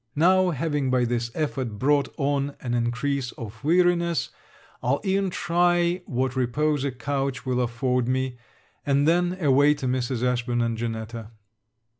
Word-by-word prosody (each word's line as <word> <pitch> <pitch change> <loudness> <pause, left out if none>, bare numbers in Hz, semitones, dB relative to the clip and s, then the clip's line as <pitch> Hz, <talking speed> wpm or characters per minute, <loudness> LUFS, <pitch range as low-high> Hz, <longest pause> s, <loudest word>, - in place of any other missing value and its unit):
Now, 185 +4 +4
having 145 -3 -1
by 125 -1 +2
this 120 0 -1
effort 130 -8 -2
brought 140 +3 +2
on 140 0 0
an 120 -2 -4
increase 125 +2 -1
of 110 0 -9
weariness, 170 0 +2 0.5
I'll 130 +4 +1
e'en 195 0 +1
try 175 0 +1
what 130 +1 -1
repose 145 +3 0
a 140 - 0
couch 135 +1 -3
will 125 -1 0
afford 125 +1 0
me; 130 -1 -1 0.4
and 140 +1 +2
then 175 +2 +2
away 145 -1 +4
to 140 - -6
Mrs. 125 -1 -1
Ashburn 120 -1 0
and 115 -1 -1
Janetta. 115 -1 -5
135 Hz, 145 wpm, -25 LUFS, 120-155 Hz, 0.5 s, Now